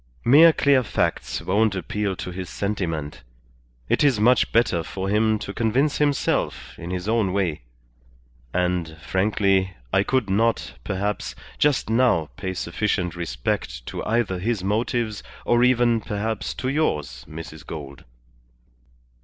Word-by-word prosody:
Mere 155 +7 +8
clear 140 -4 +3
facts 115 - -1
won't 105 +2 +2
appeal 100 +2 -2
to 90 - -6
his 90 0 -6
sentiment. 80 -10 -3 0.7
It - - +2
is 135 -7 +3
much 120 +4 +4
better 110 -7 +2
for 95 +4 -4
him 110 +1 +3
to 100 - -6
convince 125 +7 +1
himself 145 -2 0
in 85 - -6
his 90 +1 -3
own 110 -4 +1
way. 90 -6 0 0.9
And, 90 -3 -1
frankly, 95 +3 +1 0.2
I 95 - +5
could 130 +1 0
not, 115 +4 +1
perhaps, 100 +1 -2 0.2
just 150 -2 +2
now 115 -10 +2
pay 95 0 -4
sufficient 90 -1 -1
respect 60 -6 -3
to - - -5
either 110 -5 0
his 105 0 -1
motives 110 +1 -1 0.2
or 120 0 +3
even, 120 -2 +3
perhaps, 110 +2 -3
to 130 - -3
yours, 75 - -1
Mrs. 80 -1 -9
Gould." 70 -3 -8
100 Hz, 135 wpm, -23 LUFS, 90-115 Hz, 0.9 s, Mere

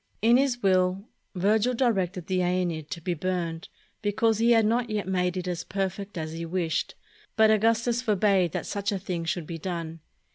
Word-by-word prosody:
In 235 +2 +6
his 260 -3 0
will, 185 +1 +2 0.3
Virgil 215 +6 +2
directed 195 -8 0
the 185 +1 0
"iEneid" 175 -4 -1
to - - -5
be 175 +2 -1
burned, 170 -1 -3 0.3
because 215 +1 +1
he 230 +1 +3
had 225 -2 +4
not 235 +2 +1
yet 210 -3 -2
made 180 -1 0
it 180 0 -4
as 175 -2 -3
perfect 195 0 -4
as 155 -1 -4
he 165 +1 -5
wished, 165 -1 -2 0.4
but 220 -1 +5
Augustus 230 +2 +2
for 220 -5 +1
bade 190 -4 +3
that - - -3
such 200 -1 -2
a 200 - -1
thing 180 -3 -4
should 165 0 -2
be 165 +1 -6
done. 165 -2 -5
190 Hz, 190 wpm, -27 LUFS, 175-220 Hz, 0.4 s, In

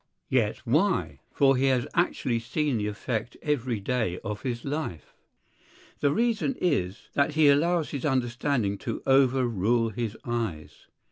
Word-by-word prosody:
Yet 115 -5 +2
why? 170 - +1
For 135 -2 +4
he 135 +2 +2
has 130 -2 +2
actually 130 -8 +1
seen 130 +3 -1
the 105 - -1
effect 110 +2 -4
every 130 -6 -1
day 110 -4 -1
of 105 0 -4
his 120 -3 -4
life. 140 - -4 0.9
The 145 - +2
reason 235 - +1
is 100 - -1
that 145 +2 +2
he 155 -2 +6
allows 165 +3 +2
his 140 - -4
understanding 120 -5 0
to - - -4
overrule 120 -4 +3
his 110 0 -4
eyes. 115 -10 -4
125 Hz, 140 wpm, -27 LUFS, 115-145 Hz, 0.9 s, he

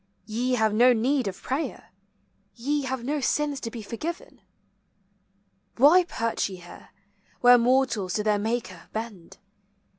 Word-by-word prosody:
Ye 240 +4 -1
have 220 -3 +2
no 245 +3 +5
need 250 +1 0
of 190 - -6
prayer; 275 +5 -4 0.6
Ye 280 +4 -1
have 260 -2 -3
no 290 +4 -1
sins 290 +1 0
to 230 - -5
be 230 -1 -8
forgiven. 305 - -6 1.4
Why 320 +8 +6
perch 230 -9 -2
ye 190 - -7
here, 175 -1 -14 0.5
Where 245 0 +7
mortals 235 -6 +1
to 210 - 0
their 210 -1 +1
Maker 215 -5 -4
bend? 215 -6 -7
240 Hz, 140 wpm, -26 LUFS, 215-265 Hz, 1.4 s, Where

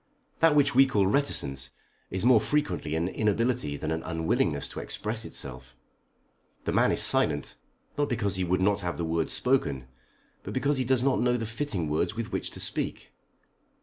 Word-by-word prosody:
That 165 -2 +5
which 145 0 +4
we 135 +2 +6
call 105 -7 +2
reticence 70 - +1 0.4
is 95 +4 -3
more 125 -3 +6
frequently 150 - -1
an 85 +2 0
inability 110 - 0
than 80 - -3
an 80 0 -2
unwillingness 80 -1 -1
to - - -6
express 110 +1 -3
itself. 65 -1 -6 0.9
The - - -1
man - - +3
is - - +5
silent, - - +2 0.4
not 145 - +1
because 110 -5 -1
he 95 - 0
would 90 +1 0
not 100 +1 +2
have 90 -3 -3
the 85 - -2
words 80 0 -1
spoken, 70 - 0 0.5
but 100 - -7
because 140 +2 +1
he 130 - 0
does 130 0 +2
not 135 -1 +2
know 125 0 +2
the 115 - -3
fitting 110 - -3
words 75 +8 -1
with 115 -2 -4
which - - -2
to - - -9
speak. - - -3
105 Hz, 180 wpm, -27 LUFS, 80-130 Hz, 0.9 s, we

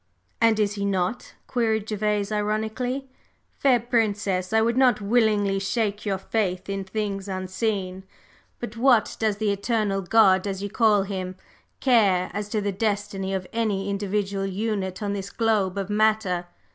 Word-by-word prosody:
"And 225 -1 +4
is 205 -1 +1
he 200 -1 -4
not?" 195 +3 -2
queried 220 -3 0
Gervase, 210 -1 -1
ironically. 220 +5 -2 0.5
"Fair 260 -3 +4
Princess, 205 -5 0
I 220 - +4
would 230 +1 +2
not 250 -4 +4
willingly 205 -2 +2
shake 210 +1 -1
your 195 -1 0
faith 190 -2 -2
in 195 0 -3
things 200 -1 -3
unseen, 190 0 -3 0.5
but 235 -2 -6
what 240 -1 +3
does 215 -2 +1
the 210 -1 +1
'Eternal 200 -1 0
God,' 190 -1 +4
as 195 0 -3
you 205 - -4
call 215 -4 +3
Him, 185 -2 -4 0.5
care 205 -8 +3
as 205 +1 -4
to 215 -1 -1
the 200 0 -1
destiny 200 -1 -2
of 190 -1 -2
any 205 -4 -1
individual 200 0 -1
unit 195 -1 -2
on 200 -1 -1
this 200 -1 -4
globe 205 -4 0
of 195 0 -3
matter? 210 -4 +1
205 Hz, 155 wpm, -25 LUFS, 195-220 Hz, 0.5 s, And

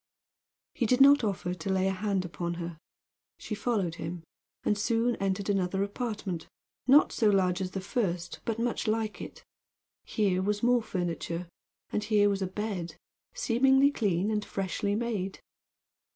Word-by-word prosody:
He 235 - 0
did 250 +3 +3
not 280 -1 +7
offer 190 -4 -1
to 180 +2 -5
lay 190 0 +2
a - - +2
hand 190 -1 -1
upon 170 0 -4
her. 170 -2 -6 0.6
She - - -6
followed 200 -7 -1
him, 165 +1 -5 0.4
and 210 - +2
soon 230 +3 +1
entered 195 0 -1
another 195 -1 +1
apartment, 205 -5 -4 0.4
not 280 +3 +6
so 220 - +3
large 185 -2 +2
as 185 - -2
the 190 +1 -4
first, 180 -4 -2
but 225 -1 -2
much 235 -1 -1
like 215 0 -1
it. - - -9 0.6
Here 195 -4 +1
was 205 +2 -1
more 245 0 +4
furniture, 175 -3 -3 0.4
and 210 - -1
here 205 -1 +4
was 200 -1 -1
a 190 - 0
bed, 190 -3 -4 0.4
seemingly 270 - +4
clean 200 -5 0
and 210 -1 0
freshly 200 +1 -2
made. 210 -4 -2
200 Hz, 155 wpm, -29 LUFS, 185-225 Hz, 0.6 s, not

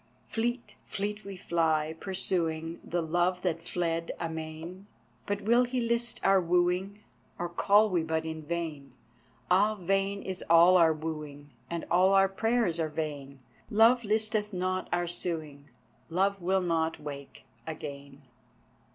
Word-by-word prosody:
Fleet, 240 +2 -3
fleet 210 +2 -4
we 195 -1 -8
fly, 160 -3 0
pursuing 170 -4 -2
The 175 0 -2
Love 175 +3 0
that 165 -3 -1
fled 165 -1 -2
amain, 160 +3 -6 0.4
But 205 0 -1
will 235 +4 +4
he 250 +1 -2
list 235 0 0
our 195 -1 +5
wooing, 180 +4 0 0.3
Or 175 - -2
call 205 +5 +4
we 175 -2 +2
but 160 0 -2
in 160 0 -5
vain? 150 -5 -5 0.6
Ah! 205 +4 +4
vain 195 +1 -1
is 185 -1 -5
all 170 +2 +7
our 165 -3 +6
wooing, 150 -2 -6 0.2
And 170 -1 -4
all 185 +2 +5
our 195 0 +6
prayers 225 -4 0
are 160 -1 0
vain, 145 -3 -5 0.3
Love 230 +3 +5
listeth 215 0 0
not 185 0 -2
our 175 0 +1
suing, 160 -5 -4 0.4
Love 195 +3 +1
will 190 +2 +1
not 165 -2 0
wake 140 -2 -9 0.2
again. 140 -2 -8
175 Hz, 140 wpm, -29 LUFS, 160-195 Hz, 0.6 s, all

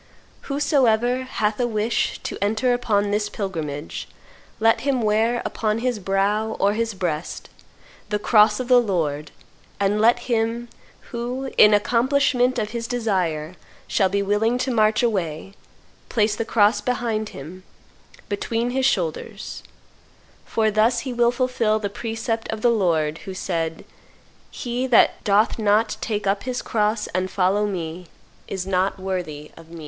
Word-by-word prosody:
Whosoever 260 -3 +2
hath 210 -4 -1
a 245 - +2
wish 220 0 0
to - - -4
enter 220 +5 +1
upon 205 -4 +1
this 210 0 0
pilgrimage, 160 -8 -5 0.5
let 225 0 +3
him 260 -3 0
wear 225 +3 +1
upon 215 -1 -1
his 245 -1 -1
brow 200 +3 0
or 200 +1 +3
his 225 -1 -2
breast 170 -4 -4 0.6
the 210 - +1
cross 210 +2 +4
of 255 - -3
the 250 -1 +6
Lord, 155 -8 -2 0.5
and 200 +1 +1
let 240 +2 +4
him, 235 0 -1 0.4
who, 250 +3 -4
in 210 - +7
accomplishment 250 +3 +2
of 215 -2 -2
his 235 -1 -4
desire, 185 -10 -1 0.3
shall 190 -2 +2
be 200 +1 0
willing 215 +4 +1
to 260 +1 -1
march 215 -1 +3
away, 190 -5 -2 0.6
place 215 -2 +1
the 230 - -3
cross 215 -1 +3
behind 230 -4 -1
him, 165 +7 -10 0.7
between 230 +4 -2
his 265 +1 +2
shoulders; 170 -10 -3 0.8
for 220 -1 +1
thus 215 +3 +2
he 260 -3 -5
will 240 0 +3
fulfil 245 -4 +1
the 210 -2 -3
precept 225 +1 -3
of 220 -1 -4
the 240 - +5
Lord, 165 -7 +1
who 190 - -6
said, 165 -3 -3 0.6
'He 245 +1 -3
that 245 - +4
doth 210 +3 +2
not 215 +1 +2
take 210 -3 -2
up 195 +1 +1
his 255 -1 -4
cross 210 0 0
and 185 +1 -1
follow 195 +3 +1
Me, 175 -2 -5 0.4
is 190 -2 -4
not 190 +1 0
worthy 180 -6 -5
of 165 0 -15
Me. 170 0 -10
215 Hz, 150 wpm, -23 LUFS, 195-235 Hz, 0.8 s, in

